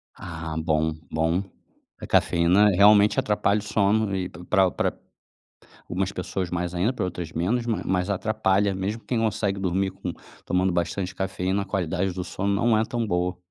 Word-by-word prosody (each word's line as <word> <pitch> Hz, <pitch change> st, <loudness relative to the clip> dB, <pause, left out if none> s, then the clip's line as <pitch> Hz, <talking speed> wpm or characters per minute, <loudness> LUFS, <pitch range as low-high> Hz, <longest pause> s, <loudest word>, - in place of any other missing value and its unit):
Ah, 80 Hz, -2 st, -6 dB
bom, 80 Hz, -1 st, +1 dB, 0.2 s
bom. 80 Hz, +4 st, +1 dB, 0.6 s
A -, -, -7 dB
cafeína 90 Hz, +5 st, +4 dB
realmente 105 Hz, +2 st, +5 dB
atrapalha 105 Hz, 0 st, +1 dB
o -, -, -8 dB
sono 105 Hz, -1 st, +1 dB
e 95 Hz, -1 st, -2 dB
para 95 Hz, +3 st, +1 dB
para -, -, -2 dB, 0.9 s
algumas -, -, -1 dB
pessoas 90 Hz, -2 st, -3 dB
mais 90 Hz, 0 st, -2 dB
ainda, 95 Hz, +8 st, +1 dB
para 125 Hz, -, -2 dB
outras 90 Hz, -2 st, -5 dB
menos, 110 Hz, +9 st, 0 dB
mas 115 Hz, -2 st, -1 dB
mas 90 Hz, +1 st, 0 dB
atrapalha 100 Hz, -1 st, +1 dB
mesmo 100 Hz, +4 st, -3 dB
quem 120 Hz, -, -1 dB
consegue 105 Hz, -3 st, 0 dB
dormir 95 Hz, +1 st, 0 dB
com 95 Hz, -2 st, -6 dB, 0.3 s
tomando 90 Hz, +1 st, +1 dB
bastante 90 Hz, +2 st, -2 dB
cafeína, 95 Hz, 0 st, -1 dB
a -, -, -11 dB
qualidade 95 Hz, -1 st, -1 dB
do 90 Hz, 0 st, -4 dB
sono 100 Hz, +3 st, -2 dB
não 110 Hz, +2 st, +3 dB
é 110 Hz, -, +3 dB
tão 120 Hz, 0 st, -2 dB
boa. 90 Hz, -2 st, -1 dB
95 Hz, 170 wpm, -25 LUFS, 90-105 Hz, 0.9 s, realmente